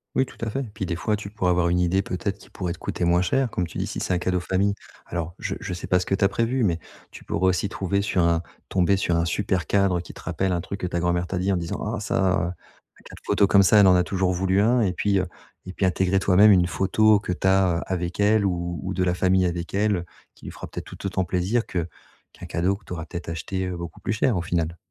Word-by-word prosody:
Oui, 130 Hz, -, +3 dB
tout -, -, -15 dB
à -, -, -2 dB
fait. 135 Hz, +6 st, -2 dB
Puis 100 Hz, -2 st, -4 dB
des 85 Hz, -, -2 dB
fois, 105 Hz, +5 st, -1 dB
tu 105 Hz, -1 st, -7 dB
pourrais 100 Hz, -3 st, -1 dB
avoir 90 Hz, -1 st, +2 dB
une 90 Hz, +1 st, +2 dB
idée 90 Hz, +2 st, +2 dB
peut-être 100 Hz, +1 st, -3 dB
qui -, -, -17 dB
pourrait 90 Hz, -3 st, -4 dB
te 85 Hz, -, -6 dB
coûter -, -, -4 dB
moins 85 Hz, +1 st, +3 dB
cher, 125 Hz, +8 st, +1 dB
comme 90 Hz, -, -1 dB
tu -, -, -9 dB
dis, -, -, -1 dB
si -, -, -5 dB
c'est -, -, -1 dB
un -, -, +2 dB
cadeau 90 Hz, +1 st, 0 dB
famille. 95 Hz, +3 st, 0 dB, 0.3 s
Alors 85 Hz, 0 st, -4 dB
je -, -, -3 dB
je -, -, -5 dB
sais 90 Hz, -, -6 dB
pas 90 Hz, -, +3 dB
ce 90 Hz, -, -3 dB
que 95 Hz, -, +1 dB
tu 100 Hz, -, -1 dB
as 100 Hz, -, +5 dB
prévu, 115 Hz, +5 st, 0 dB
mais 85 Hz, -5 st, +1 dB, 0.3 s
tu -, -, -12 dB
pourrais 95 Hz, +1 st, +1 dB
aussi 95 Hz, +2 st, 0 dB
trouver 100 Hz, 0 st, -1 dB
sur 100 Hz, -2 st, 0 dB
un 85 Hz, -1 st, +2 dB, 0.3 s
tomber 95 Hz, +1 st, +3 dB
sur 85 Hz, -3 st, 0 dB
un 85 Hz, -, +1 dB
super 90 Hz, -2 st, -1 dB
cadre 100 Hz, -3 st, +2 dB
qui 85 Hz, -, -9 dB
te -, -, -12 dB
rappelle 95 Hz, -1 st, -1 dB
un 85 Hz, -, -1 dB
truc 100 Hz, +3 st, -6 dB
que 90 Hz, -, -2 dB
ta 85 Hz, -1 st, -2 dB
grand-mère 85 Hz, 0 st, 0 dB
t'a 95 Hz, -, -3 dB
dit, 95 Hz, +2 st, 0 dB
en 95 Hz, -, +1 dB
disant: 85 Hz, -1 st, -4 dB
«Ah, -, -, -4 dB
ça, -, -, -3 dB, 0.2 s
heu, -, -, -1 dB
un 85 Hz, -1 st, -12 dB
cadre -, -, -13 dB
photos 100 Hz, -, +3 dB
comme 100 Hz, -, +6 dB
ça, 95 Hz, +3 st, +5 dB
elle 100 Hz, -, +7 dB
en 90 Hz, -, +6 dB
a 90 Hz, -, +4 dB
toujours 95 Hz, 0 st, 0 dB
voulu 95 Hz, +2 st, +1 dB
un» 120 Hz, +4 st, +3 dB
et 95 Hz, -5 st, +1 dB
puis, 100 Hz, +1 st, +1 dB
heu, 95 Hz, -, -1 dB, 0.4 s
et 95 Hz, -, -7 dB
puis 95 Hz, -, 0 dB
intégrer 95 Hz, +1 st, +2 dB
toi-même 100 Hz, +2 st, +6 dB
une 90 Hz, -2 st, +4 dB
photo 105 Hz, +3 st, +3 dB
que 90 Hz, -, -3 dB
tu 90 Hz, -, -5 dB
as, 95 Hz, -3 st, +3 dB
heu, -, -, -5 dB
avec 90 Hz, +1 st, -2 dB
elle 105 Hz, 0 st, +4 dB
ou 85 Hz, -2 st, -2 dB
ou 95 Hz, -, -3 dB
de 95 Hz, -, 0 dB
la 90 Hz, -1 st, +1 dB
famille 95 Hz, 0 st, +3 dB
avec 85 Hz, -1 st, -3 dB
elle 100 Hz, -3 st, +1 dB, 0.3 s
qui -, -, -17 dB
lui -, -, -6 dB
fera -, -, -8 dB
peut-être -, -, -7 dB
tout -, -, -10 dB
autant 95 Hz, -1 st, 0 dB
plaisir 95 Hz, +7 st, 0 dB
que 85 Hz, -3 st, -3 dB, 0.4 s
qu'un -, -, -11 dB
cadeau 95 Hz, +4 st, 0 dB
que -, -, -25 dB
tu -, -, -7 dB
auras 80 Hz, -2 st, -5 dB
peut-être 85 Hz, +1 st, -7 dB
acheté, 95 Hz, +3 st, -3 dB
heu, 90 Hz, -, -4 dB
beaucoup 85 Hz, -2 st, -7 dB
plus -, -, -2 dB
cher, 110 Hz, -1 st, +1 dB
au -, -, 0 dB
final. 85 Hz, -1 st, -2 dB
95 Hz, 285 wpm, -24 LUFS, 85-100 Hz, 0.4 s, elle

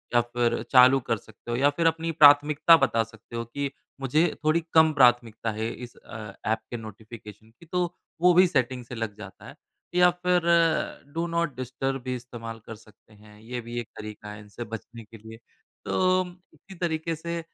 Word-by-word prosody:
या 120 Hz, -, +6 dB
फ़िर 120 Hz, 0 st, -1 dB
चालू 130 Hz, +1 st, +7 dB
कर 115 Hz, -3 st, -2 dB
सकते 110 Hz, +3 st, -12 dB
हो 120 Hz, -, -1 dB
या 140 Hz, +2 st, +4 dB
फ़िर 165 Hz, +3 st, +1 dB
अपनी 165 Hz, 0 st, 0 dB
प्राथमिकता 150 Hz, +1 st, +6 dB
बता 115 Hz, -5 st, +1 dB
सकते 115 Hz, +1 st, -14 dB
हो 115 Hz, 0 st, -3 dB
कि 140 Hz, +4 st, -4 dB, 0.3 s
मुझे 155 Hz, +6 st, +2 dB, 0.2 s
थोड़ी 155 Hz, +2 st, +3 dB
कम 160 Hz, -1 st, +6 dB
प्राथमिकता 120 Hz, -4 st, +3 dB
है 110 Hz, +2 st, -3 dB
इस 125 Hz, -1 st, -10 dB
अ, 105 Hz, -2 st, -10 dB
ऐप 110 Hz, +1 st, +1 dB
के 120 Hz, -, -3 dB
नोटिफ़िकेशन 110 Hz, 0 st, -11 dB
की 170 Hz, -, -15 dB
तो 175 Hz, +1 st, -2 dB, 0.3 s
वो 180 Hz, 0 st, +6 dB
भी 180 Hz, +2 st, +6 dB
सेटिंग 130 Hz, -5 st, -1 dB
से 125 Hz, -, -8 dB
लग 110 Hz, -2 st, -4 dB
जाता 100 Hz, -2 st, -11 dB
है। -, -, -11 dB, 0.4 s
या 180 Hz, 0 st, +6 dB
फ़िर 180 Hz, 0 st, +1 dB, 0.7 s
डू 165 Hz, +1 st, -1 dB
नॉट 170 Hz, -3 st, -1 dB
डिस्टर्ब 130 Hz, +1 st, -3 dB
भी 130 Hz, 0 st, -3 dB
इस्तेमाल 115 Hz, -2 st, -8 dB
कर 115 Hz, -, -8 dB
सकते 110 Hz, 0 st, -21 dB
हैं 105 Hz, 0 st, -18 dB
ये 120 Hz, +2 st, -6 dB
भी 120 Hz, +1 st, -5 dB
एक 120 Hz, -, -6 dB
तरीका 105 Hz, -1 st, -8 dB
है 105 Hz, -, -9 dB
इनसे 105 Hz, +3 st, -9 dB
बचने 115 Hz, +2 st, -8 dB
के 115 Hz, +1 st, -14 dB
लिए। 110 Hz, +1 st, -12 dB, 0.5 s
तो 185 Hz, 0 st, +2 dB, 0.3 s
इसी 195 Hz, -, -15 dB
तरीके 165 Hz, -1 st, -2 dB
से 170 Hz, +1 st, -5 dB
125 Hz, 190 wpm, -26 LUFS, 115-160 Hz, 0.7 s, चालू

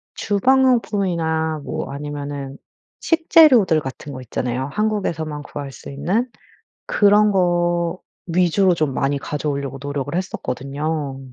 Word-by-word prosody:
주방용품이나 200 Hz, -, +1 dB
뭐 -, -, -4 dB
아니면은 145 Hz, -1 st, -6 dB, 0.4 s
식재료들 300 Hz, -, +5 dB
같은 140 Hz, +2 st, -7 dB
거 130 Hz, -, -7 dB
있잖아요. 125 Hz, +2 st, -3 dB
한국에서만 170 Hz, -9 st, -2 dB
구할 140 Hz, -1 st, -7 dB
수 -, -, -10 dB
있는 190 Hz, -, 0 dB, 0.6 s
그런 210 Hz, 0 st, +4 dB
거 175 Hz, -1 st, +1 dB, 0.3 s
위주로 180 Hz, +2 st, +3 dB
좀 155 Hz, -5 st, 0 dB
많이 140 Hz, +2 st, 0 dB
가져 150 Hz, +2 st, -3 dB
오려고 140 Hz, -1 st, -4 dB
노력을 145 Hz, 0 st, -4 dB
했었거든요. 145 Hz, -4 st, -3 dB
160 Hz, 285 characters per minute, -21 LUFS, 140-195 Hz, 0.6 s, 식재료들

